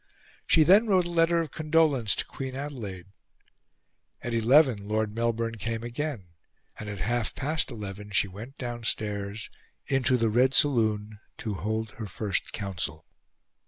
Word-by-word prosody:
She 160 Hz, -, +6 dB
then 200 Hz, +8 st, +6 dB
wrote 185 Hz, -4 st, +3 dB
a 175 Hz, -, -4 dB
letter 170 Hz, 0 st, +3 dB
of 160 Hz, -, -5 dB
condolence 155 Hz, -8 st, +2 dB
to -, -, -2 dB
Queen 130 Hz, -1 st, -6 dB
Adelaide. 120 Hz, -11 st, -6 dB, 1.2 s
At 120 Hz, -, -3 dB
eleven, 115 Hz, -2 st, +4 dB
Lord 110 Hz, 0 st, 0 dB
Melbourne 115 Hz, 0 st, -1 dB
came 115 Hz, +2 st, -3 dB
again; 120 Hz, -, -4 dB, 0.5 s
and 105 Hz, -, -6 dB
at 105 Hz, -, -5 dB
half 115 Hz, +4 st, -1 dB
past 150 Hz, +3 st, -1 dB
eleven 105 Hz, -3 st, -7 dB
she 100 Hz, 0 st, +2 dB
went 110 Hz, +9 st, -10 dB
downstairs 110 Hz, -4 st, -3 dB, 0.3 s
into 130 Hz, -1 st, +2 dB
the 115 Hz, -2 st, +2 dB
red 130 Hz, +4 st, +3 dB
saloon 110 Hz, -7 st, +2 dB, 0.2 s
to 110 Hz, -, -3 dB
hold 110 Hz, +4 st, -2 dB
her 110 Hz, -2 st, -7 dB
first 100 Hz, +1 st, -2 dB
Council. 85 Hz, -6 st, -4 dB
115 Hz, 145 wpm, -28 LUFS, 105-135 Hz, 1.2 s, She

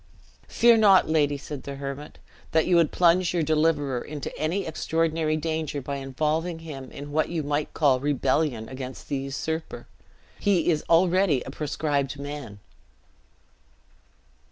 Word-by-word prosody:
"Fear 235 Hz, -1 st, +5 dB
not, 200 Hz, -4 st, +6 dB
lady," 145 Hz, -2 st, +2 dB
said 140 Hz, 0 st, -7 dB
the 140 Hz, -, -7 dB
hermit, 140 Hz, +1 st, -7 dB, 0.4 s
"that 160 Hz, 0 st, +3 dB
you 180 Hz, -, +3 dB
would 165 Hz, -3 st, +3 dB
plunge 180 Hz, +1 st, +3 dB
your 170 Hz, -, +2 dB
deliverer 150 Hz, -5 st, +1 dB
into 145 Hz, -1 st, -6 dB
any 175 Hz, +5 st, -1 dB
extraordinary 160 Hz, 0 st, 0 dB
danger 155 Hz, -2 st, -2 dB
by 140 Hz, +1 st, -4 dB
involving 155 Hz, +5 st, -1 dB
him 145 Hz, -5 st, -9 dB
in 145 Hz, +1 st, -8 dB
what 155 Hz, +1 st, +1 dB
you 165 Hz, -3 st, -2 dB
might 145 Hz, +1 st, -2 dB
call 140 Hz, -4 st, +3 dB
rebellion 135 Hz, -3 st, 0 dB
against 130 Hz, 0 st, -8 dB
the 140 Hz, -, 0 dB
usurper. 145 Hz, +4 st, -4 dB, 0.5 s
He 185 Hz, -4 st, +2 dB
is 155 Hz, -2 st, -1 dB
already 175 Hz, -4 st, +3 dB
a -, -, -8 dB
proscribed 145 Hz, -1 st, -2 dB
man." 145 Hz, -7 st, -7 dB
150 Hz, 140 wpm, -25 LUFS, 140-165 Hz, 0.5 s, not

